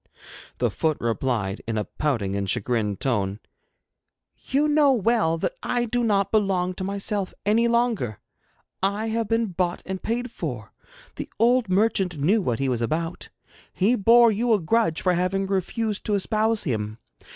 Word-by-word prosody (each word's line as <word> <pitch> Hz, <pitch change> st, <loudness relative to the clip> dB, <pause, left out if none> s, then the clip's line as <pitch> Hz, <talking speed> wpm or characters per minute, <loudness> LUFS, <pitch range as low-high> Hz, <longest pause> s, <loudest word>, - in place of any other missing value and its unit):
The -, -, 0 dB
foot 155 Hz, -2 st, 0 dB
replied 115 Hz, -4 st, -1 dB
in 115 Hz, -1 st, -2 dB
a 105 Hz, -, 0 dB
pouting 105 Hz, -4 st, -2 dB
and 100 Hz, -1 st, -2 dB
chagrined 110 Hz, -2 st, 0 dB
tone: 105 Hz, -7 st, -1 dB, 1.0 s
'You 285 Hz, +3 st, 0 dB
know 295 Hz, -2 st, +4 dB
well 220 Hz, -7 st, +2 dB
that 330 Hz, -, -2 dB
I 245 Hz, -1 st, 0 dB
do 240 Hz, +1 st, -1 dB
not 200 Hz, -3 st, +1 dB
belong 190 Hz, -4 st, +1 dB
to 185 Hz, -, -6 dB
myself 200 Hz, 0 st, -2 dB
any 225 Hz, +3 st, +3 dB
longer. 235 Hz, -, 0 dB, 0.6 s
I 205 Hz, +3 st, 0 dB
have 225 Hz, 0 st, -1 dB
been 225 Hz, 0 st, +1 dB
bought 175 Hz, 0 st, -2 dB
and 190 Hz, -1 st, -5 dB
paid 240 Hz, +2 st, -2 dB
for. 125 Hz, -, -6 dB, 0.4 s
The -, -, -5 dB
old 240 Hz, 0 st, +3 dB
merchant 190 Hz, -3 st, +1 dB
knew 190 Hz, +10 st, +2 dB
what 120 Hz, -10 st, -1 dB
he 135 Hz, -, -1 dB
was 125 Hz, -2 st, -1 dB
about. 165 Hz, +8 st, -3 dB, 0.4 s
He 210 Hz, +6 st, +2 dB
bore 235 Hz, +2 st, +6 dB
you 230 Hz, +3 st, +1 dB
a 210 Hz, -, +3 dB
grudge 165 Hz, -1 st, +1 dB
for 180 Hz, -, +3 dB
having 185 Hz, +2 st, 0 dB
refused 200 Hz, +3 st, -2 dB
to 210 Hz, -, +1 dB
espouse 215 Hz, +2 st, +1 dB
him. 110 Hz, -5 st, -3 dB
195 Hz, 160 wpm, -24 LUFS, 135-225 Hz, 1.0 s, bore